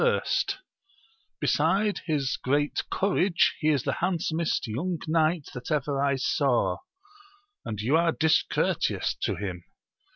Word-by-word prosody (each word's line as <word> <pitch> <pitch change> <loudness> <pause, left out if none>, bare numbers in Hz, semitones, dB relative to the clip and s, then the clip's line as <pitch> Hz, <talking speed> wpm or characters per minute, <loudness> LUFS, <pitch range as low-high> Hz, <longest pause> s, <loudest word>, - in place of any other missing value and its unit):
first 475 -4 +1
r 380 - -27 0.8
besides 195 +7 +1
his 145 -5 0
great 145 +3 +1
courage, 190 -2 +2
he 155 - 0
is 145 -5 +2
the - - -1
handsomest 170 -2 0
young 165 +11 -2
knight 160 -1 +1
that 125 -1 -7
ever 145 -2 0
I 140 -1 +2
saw, 125 -8 +1 0.9
and 105 -2 -5
you 120 +8 +1
are 165 0 +3
discour 160 0 +2
teous - - 0
to - - 0
him. 90 -2 -5
155 Hz, 135 wpm, -27 LUFS, 135-170 Hz, 0.9 s, are